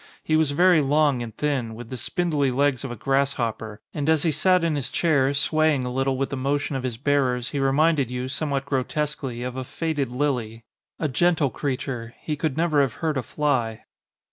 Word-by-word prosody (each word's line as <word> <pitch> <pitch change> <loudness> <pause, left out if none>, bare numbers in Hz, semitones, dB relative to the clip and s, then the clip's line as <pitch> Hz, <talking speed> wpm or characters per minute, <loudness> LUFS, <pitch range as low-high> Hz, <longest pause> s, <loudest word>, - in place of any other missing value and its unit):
He 155 - +1
was 155 -2 +3
very 175 +2 +4
long 145 -2 +2
and 115 -1 -5
thin, 130 -7 -1
with 120 +1 -10
the - - -3
spin 175 +7 -2
dly 145 -3 +2
legs 135 -1 +1
of 135 - -4
a 120 - -5
grasshopper, 115 -4 -1
and 150 0 -1
as 160 -2 +3
he 165 - +2
sat 180 +4 +3
in 165 -2 +1
his 140 -5 -3
chair 140 -5 +2
swaying 155 -2 +2
a 125 - -3
little 135 0 0
with 135 +2 -2
the - - -1
motion 140 +2 -1
of 135 - -2
his 125 -3 -3
bearers 130 -2 +1
he 145 - -2
reminded 140 0 +2
you, 125 0 -3
somewhat 140 0 -2
grotesquely, 135 -2 -2
of 125 0 -4
a 130 - -3
faded 145 -1 -2
lily. 125 -4 -2 0.3
A 155 - -1
gentle 160 0 +2
creature. 125 -4 -4
He 155 - -3
could 150 -1 -2
never 160 -3 +3
have 135 -5 0
hurt 160 -2 -2
a 130 - 0
fly. 120 -4 -1
140 Hz, 205 wpm, -24 LUFS, 125-150 Hz, 0.3 s, very